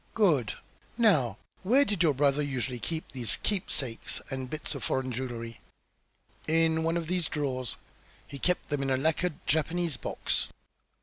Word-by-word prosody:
"Good! 155 Hz, -, +3 dB, 0.4 s
Now, 150 Hz, -, +4 dB, 0.2 s
where 260 Hz, +9 st, +5 dB
did 205 Hz, -7 st, -1 dB
your 155 Hz, -5 st, +4 dB
brother 140 Hz, +1 st, +3 dB
usually 130 Hz, -3 st, -2 dB
keep 160 Hz, +6 st, -3 dB
these 120 Hz, -5 st, +1 dB
keepsakes 140 Hz, -, 0 dB
and 130 Hz, -1 st, -3 dB
bits 155 Hz, +2 st, -4 dB
of 140 Hz, -, -6 dB
foreign 130 Hz, -1 st, 0 dB
jewellery?" 115 Hz, -2 st, -5 dB, 0.9 s
"In 160 Hz, 0 st, +3 dB
one 165 Hz, +1 st, +1 dB
of 170 Hz, -, -2 dB
these 180 Hz, 0 st, 0 dB
drawers. 130 Hz, -5 st, -1 dB, 0.5 s
He 140 Hz, -, -8 dB
kept 180 Hz, +4 st, +1 dB
them 145 Hz, -2 st, 0 dB
in 135 Hz, -, 0 dB
a 130 Hz, -, +3 dB
lacquered 160 Hz, +4 st, +1 dB
Japanese 160 Hz, -1 st, +1 dB
box." -, -, -1 dB
145 Hz, 150 wpm, -29 LUFS, 130-170 Hz, 0.9 s, where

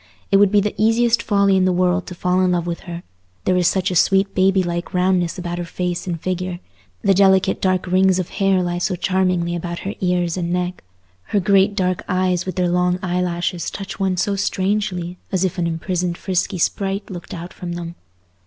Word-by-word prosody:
It 195 Hz, -, +6 dB
would 200 Hz, -1 st, +5 dB
be 205 Hz, -1 st, +4 dB
the 210 Hz, +1 st, -1 dB
easiest 225 Hz, 0 st, +3 dB
folly 200 Hz, -2 st, +3 dB
in 185 Hz, -1 st, +3 dB
the 185 Hz, -, +3 dB
world 180 Hz, +1 st, +1 dB
to 180 Hz, -, -7 dB
fall 180 Hz, +1 st, +1 dB
in 185 Hz, -1 st, +2 dB
love 175 Hz, -1 st, 0 dB
with 170 Hz, -1 st, -3 dB
her: 175 Hz, -1 st, -7 dB, 0.4 s
there 185 Hz, -, +3 dB
is 180 Hz, -2 st, +3 dB
such 190 Hz, 0 st, +1 dB
a -, -, -2 dB
sweet 195 Hz, +3 st, +3 dB
babylike 185 Hz, -2 st, +1 dB
roundness 180 Hz, -1 st, +1 dB
about 175 Hz, -1 st, -4 dB
her -, -, -2 dB
face 175 Hz, +1 st, -3 dB
and 170 Hz, -2 st, -2 dB
figure; 185 Hz, 0 st, -3 dB, 0.4 s
the 200 Hz, -2 st, +4 dB
delicate 190 Hz, 0 st, +3 dB
dark 185 Hz, -1 st, +1 dB
rings 185 Hz, 0 st, +3 dB
of 185 Hz, -2 st, -2 dB
hair 195 Hz, -2 st, +1 dB
lie 175 Hz, 0 st, -2 dB
so 185 Hz, +1 st, 0 dB
charmingly 180 Hz, -1 st, 0 dB
about 170 Hz, 0 st, -4 dB
her 200 Hz, -, -2 dB
ears 180 Hz, -1 st, 0 dB
and 170 Hz, -1 st, -2 dB
neck; 180 Hz, 0 st, -2 dB, 0.4 s
her 205 Hz, -, 0 dB
great 200 Hz, +1 st, +3 dB
dark 185 Hz, -2 st, 0 dB
eyes 185 Hz, -1 st, 0 dB
with 185 Hz, -, -3 dB
their 180 Hz, -1 st, +1 dB
long 180 Hz, 0 st, +1 dB
eye 180 Hz, 0 st, 0 dB
lashes 175 Hz, -1 st, -2 dB
touch 195 Hz, 0 st, -7 dB
one 190 Hz, -2 st, 0 dB
so 200 Hz, +2 st, 0 dB
strangely, 190 Hz, -2 st, -1 dB
as 190 Hz, -1 st, +1 dB
if 185 Hz, 0 st, -2 dB
an 170 Hz, -, +1 dB
imprisoned 175 Hz, +1 st, -2 dB
frisky 185 Hz, 0 st, -1 dB
sprite 195 Hz, +3 st, -1 dB
looked 175 Hz, -1 st, -7 dB
out 175 Hz, +1 st, -8 dB
of 175 Hz, -1 st, -4 dB
them. 170 Hz, -1 st, -6 dB
185 Hz, 210 wpm, -20 LUFS, 175-190 Hz, 0.4 s, It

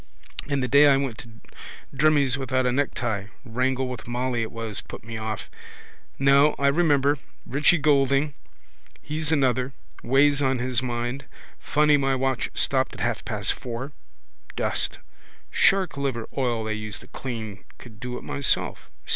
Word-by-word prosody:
And 140 Hz, -2 st, 0 dB
the -, -, 0 dB
day 140 Hz, +3 st, +7 dB
I 140 Hz, -1 st, +6 dB
went 135 Hz, -5 st, -3 dB
to 120 Hz, -, -9 dB, 0.7 s
Drimmie's 145 Hz, -2 st, +3 dB
without 130 Hz, -1 st, 0 dB
a 125 Hz, -, +2 dB
necktie. 120 Hz, -6 st, -1 dB, 0.2 s
Wrangle 130 Hz, +2 st, 0 dB
with 125 Hz, -3 st, -7 dB
Molly 120 Hz, 0 st, -1 dB
it 110 Hz, -, -3 dB
was 115 Hz, -2 st, -5 dB
put -, -, -10 dB
me 115 Hz, +1 st, -7 dB
off. 110 Hz, -1 st, -4 dB, 0.7 s
No, 140 Hz, +2 st, +5 dB
I 140 Hz, 0 st, +3 dB
remember. 145 Hz, -2 st, +3 dB, 0.3 s
Richie 150 Hz, +6 st, +3 dB
Goulding: 140 Hz, -1 st, +2 dB, 0.7 s
he's 155 Hz, +1 st, -1 dB
another. 130 Hz, -3 st, +1 dB, 0.3 s
Weighs 140 Hz, +2 st, +3 dB
on 135 Hz, -1 st, +2 dB
his 125 Hz, 0 st, 0 dB
mind. 120 Hz, +1 st, -3 dB, 0.3 s
Funny 150 Hz, 0 st, +3 dB
my 135 Hz, -1 st, +1 dB
watch 130 Hz, -1 st, -1 dB
stopped 130 Hz, -1 st, +1 dB
at -, -, -10 dB
half 115 Hz, -3 st, -1 dB
past 105 Hz, -3 st, 0 dB
four. 125 Hz, +3 st, -6 dB, 0.6 s
Dust. -, -, -1 dB, 0.5 s
Shark 195 Hz, -4 st, +3 dB
liver 130 Hz, -5 st, -2 dB
oil 120 Hz, -4 st, 0 dB
they 110 Hz, 0 st, -2 dB
use 110 Hz, -1 st, -5 dB
to -, -, -14 dB
clean. 110 Hz, -7 st, -6 dB
Could 110 Hz, -3 st, -14 dB
do 125 Hz, 0 st, -5 dB
it -, -, -9 dB
myself. 140 Hz, -2 st, -1 dB
130 Hz, 155 wpm, -25 LUFS, 120-140 Hz, 0.7 s, day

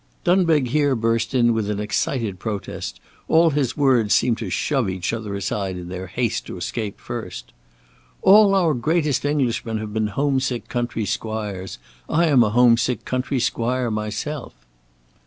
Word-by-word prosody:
Dunbeg 165 Hz, -7 st, +3 dB
here 145 Hz, 0 st, +2 dB
burst 115 Hz, +1 st, 0 dB
in 120 Hz, -2 st, +4 dB
with 110 Hz, -2 st, -1 dB
an 105 Hz, -1 st, -2 dB
excited 105 Hz, -1 st, -2 dB
protest; 105 Hz, -2 st, -5 dB, 0.3 s
all 165 Hz, 0 st, +4 dB
his 140 Hz, -2 st, -1 dB
words 125 Hz, -7 st, +3 dB
seemed 120 Hz, -2 st, +2 dB
to 110 Hz, -, -4 dB
shove 130 Hz, +2 st, 0 dB
each 95 Hz, +3 st, -2 dB
other 110 Hz, -3 st, -4 dB
aside 100 Hz, -1 st, -3 dB
in 90 Hz, 0 st, -7 dB
their 95 Hz, +1 st, -6 dB
haste 115 Hz, +5 st, -2 dB
to -, -, -7 dB
escape 100 Hz, +4 st, -4 dB
first. 115 Hz, -7 st, -7 dB, 0.7 s
"All 200 Hz, 0 st, +7 dB
our 170 Hz, -5 st, +3 dB
greatest 145 Hz, +2 st, 0 dB
Englishmen 120 Hz, -6 st, 0 dB
have 105 Hz, -1 st, -6 dB
been 110 Hz, -1 st, 0 dB
home 135 Hz, +6 st, 0 dB
sick 130 Hz, -2 st, -3 dB
country 120 Hz, -3 st, -2 dB
squires. 105 Hz, -3 st, -4 dB, 0.3 s
I 170 Hz, +3 st, +3 dB
am 140 Hz, -7 st, +5 dB
a 110 Hz, -, +1 dB
home 120 Hz, +1 st, +5 dB
sick 120 Hz, -1 st, -1 dB
country 130 Hz, +1 st, -1 dB
squire 120 Hz, +1 st, 0 dB
myself." 110 Hz, +7 st, -4 dB
120 Hz, 160 wpm, -22 LUFS, 105-140 Hz, 0.7 s, All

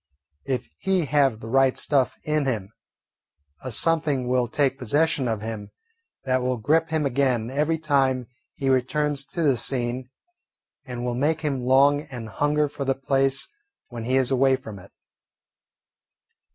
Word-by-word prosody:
If 130 Hz, -, -2 dB
he 190 Hz, -4 st, +1 dB
have 135 Hz, -6 st, +2 dB
the 110 Hz, -, -8 dB
right 135 Hz, +2 st, +3 dB
stuff 135 Hz, -4 st, +1 dB
in 150 Hz, -2 st, 0 dB
him, 105 Hz, -7 st, -2 dB, 0.9 s
a 130 Hz, -, -4 dB
something 150 Hz, -1 st, 0 dB
will 125 Hz, -1 st, +1 dB
take 135 Hz, +2 st, 0 dB
possession 145 Hz, +2 st, +1 dB
of 110 Hz, -2 st, -2 dB
him 110 Hz, -2 st, -5 dB, 0.5 s
that 130 Hz, -1 st, +1 dB
will 125 Hz, 0 st, 0 dB
grip 155 Hz, +8 st, +1 dB
him 160 Hz, -2 st, 0 dB
again 125 Hz, -3 st, 0 dB
every 150 Hz, +4 st, +1 dB
time 135 Hz, -5 st, +1 dB, 0.3 s
he 135 Hz, -, -3 dB
returns 140 Hz, +2 st, +1 dB
to 165 Hz, +5 st, -3 dB
the 140 Hz, -4 st, +4 dB
scene 125 Hz, +1 st, -2 dB, 0.8 s
and 125 Hz, -2 st, -5 dB
will 125 Hz, -, -1 dB
make 150 Hz, +6 st, 0 dB
him 140 Hz, -4 st, -1 dB
long 135 Hz, +3 st, +4 dB
and 120 Hz, -4 st, -7 dB
hunger 150 Hz, +5 st, +1 dB
for 140 Hz, 0 st, -5 dB
the 135 Hz, 0 st, 0 dB
place 135 Hz, 0 st, +1 dB, 0.4 s
when 115 Hz, -2 st, -6 dB
he 130 Hz, +2 st, +1 dB
is 130 Hz, 0 st, +1 dB
away 135 Hz, 0 st, +4 dB
from 110 Hz, -5 st, -9 dB
it. 100 Hz, +2 st, -16 dB
135 Hz, 155 wpm, -24 LUFS, 125-145 Hz, 0.9 s, the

